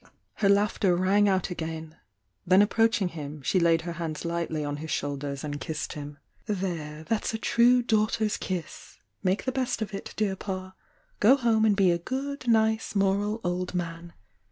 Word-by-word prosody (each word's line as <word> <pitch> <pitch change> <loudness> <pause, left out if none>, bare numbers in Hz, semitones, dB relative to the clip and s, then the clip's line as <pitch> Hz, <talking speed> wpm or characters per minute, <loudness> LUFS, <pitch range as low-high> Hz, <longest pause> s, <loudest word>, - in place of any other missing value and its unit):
Her 200 - +2
laughter 200 -2 +3
rang 200 +3 +3
out 190 -1 0
again,— 160 -2 -5 0.5
then 185 +3 +5
ap 205 - 0
proachmg 225 -5 +2
him, 150 -2 -7
sue 185 - +2
laid 165 -1 +3
her 175 - -4
hands 165 -1 -5
lightly 170 -3 -2
on 145 0 -3
his 160 +2 -7
shoulders 140 -1 -3
and 145 -1 -4
kissed 155 -1 -4
him. 145 -1 -8 0.3
"There, 170 -7 -3
that's 225 +4 -1
a - - -1
true 240 +2 +4
daughter 220 -1 +1
s 210 - 0
kiss!— 180 -3 -6 0.2
make 190 +1 0
the 260 - 0
best 260 -1 -1
of 215 -2 -4
it, 195 - -7
dear 205 -3 0
Pa' 185 -1 -5 0.5
Go 235 +6 +7
home 230 -4 +2
and 210 -2 +4
be 195 -3 +4
a 170 - 0
good, 270 +7 -4
nice, 220 -1 +2
moral 200 +3 +1
old 180 0 -2
man! 170 -1 -4
185 Hz, 180 wpm, -27 LUFS, 165-215 Hz, 0.5 s, Go